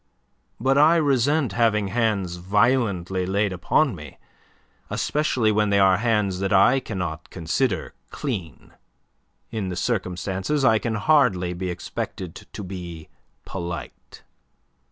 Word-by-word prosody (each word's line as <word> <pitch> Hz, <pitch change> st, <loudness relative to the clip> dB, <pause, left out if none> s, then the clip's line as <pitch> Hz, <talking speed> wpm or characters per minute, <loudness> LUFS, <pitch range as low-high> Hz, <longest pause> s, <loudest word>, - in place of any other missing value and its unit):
But 135 Hz, +3 st, +3 dB
I 155 Hz, +3 st, +6 dB
resent 145 Hz, -, +2 dB
having 105 Hz, -3 st, +2 dB
hands 100 Hz, -5 st, 0 dB
violently 95 Hz, -2 st, +1 dB
laid 100 Hz, +1 st, 0 dB
upon 130 Hz, -, +2 dB
me, 75 Hz, -6 st, -10 dB, 0.7 s
especially 130 Hz, -7 st, +1 dB
when 105 Hz, 0 st, +2 dB
they 100 Hz, -, +3 dB
are 95 Hz, -1 st, +5 dB
hands 105 Hz, -5 st, 0 dB
that 95 Hz, +1 st, -1 dB
I 100 Hz, +7 st, +5 dB
cannot 90 Hz, -, -5 dB
consider 95 Hz, +5 st, -1 dB, 0.2 s
clean. 100 Hz, -, -6 dB, 0.8 s
In 105 Hz, -5 st, -3 dB
the 90 Hz, -, -4 dB
circumstances 95 Hz, +6 st, -1 dB
I 110 Hz, -2 st, +5 dB
can 115 Hz, -1 st, -2 dB
hardly 105 Hz, -, +2 dB
be 90 Hz, +1 st, -4 dB
expected 90 Hz, 0 st, -5 dB, 0.2 s
to 105 Hz, -, -7 dB
be 90 Hz, -4 st, -8 dB, 0.4 s
polite." 85 Hz, -2 st, -7 dB
100 Hz, 120 wpm, -24 LUFS, 90-120 Hz, 0.8 s, I